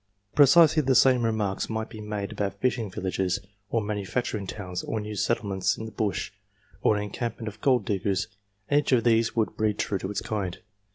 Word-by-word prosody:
Precisely 155 +2 +6
the 135 -2 +2
same 130 -2 +5
remarks 110 -4 -1
might 110 0 -2
be 110 - -9
made 105 -1 -4
about 100 -2 -2
fishing 120 -2 0
villages, 95 0 -1 0.3
or 115 - +1
manufacturing 105 0 -2
towns, 90 -3 -5
or 110 - -3
new 105 0 -5
settlements 100 -3 0
in 110 - -6
the 110 - -7
Bush, 105 -3 -2 0.5
or 105 - +3
an 105 - -2
encampment 115 +2 -4
of 105 0 -7
gold 125 -6 +3
diggers, 100 -1 0 0.4
and 145 - +4
each 150 - -2
of 120 -3 +4
these 115 -1 +3
would 110 -2 0
breed 110 -1 0
true 100 - -1
to 95 - -4
its 105 - -2
kind. 100 -5 -3
105 Hz, 190 wpm, -27 LUFS, 100-115 Hz, 0.5 s, Precisely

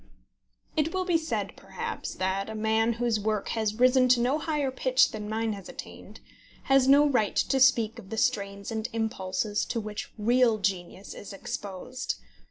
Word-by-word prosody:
It 315 +2 0
will 370 0 0
be 345 -3 +2
said, 315 - -3
perhaps, - - -6
that 190 +2 -1
a 220 - -5
man 220 +1 +2
whose 235 -1 0
work 215 -1 -1
has 220 -2 -1
risen 255 +2 +5
to 250 -1 +5
no 255 +6 +1
higher 300 -4 -1
pitch 260 0 +3
than 210 -2 -6
mine 220 0 -1
has 195 -3 -9
attained, - - -10 0.4
has 270 -1 +4
no 285 +2 +7
right 230 -7 +1
to 270 - +2
speak 235 -3 +4
of 190 -4 -13
the 225 - -5
strains 200 -1 -1
and 220 +1 -3
impulses 205 -2 -1
to 230 - -2
which 215 -1 -6
real 235 +1 +3
genius 190 -1 -3
is 200 - -9
exposed. 235 +3 -5
225 Hz, 175 wpm, -28 LUFS, 210-255 Hz, 0.4 s, no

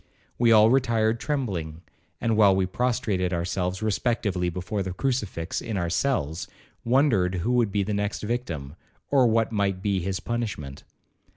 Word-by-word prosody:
We 120 -1 +4
all 110 0 +7
retired 115 -3 +2
trembling, 90 - -3 0.4
and 115 -1 +1
while 100 -3 +5
we 95 -1 +2
prostrated 105 -3 -1
ourselves 90 +3 -2
respectively 105 -4 0
before 90 +4 -3
the 95 -1 -3
crucifix 105 -8 -2
in 110 -3 -4
our 85 -2 -1
cells, 90 - -1 0.4
wondered 115 -8 +2
who 90 +7 -1
would 120 -4 +2
be 100 0 +1
the 105 +2 -3
next 105 +1 -2
victim, 85 - -4 0.4
or 135 -3 +5
what 115 0 +2
might 100 -3 -1
be 100 -2 +1
his 95 +1 -2
punishment. 105 - -4
105 Hz, 155 wpm, -25 LUFS, 90-120 Hz, 0.4 s, all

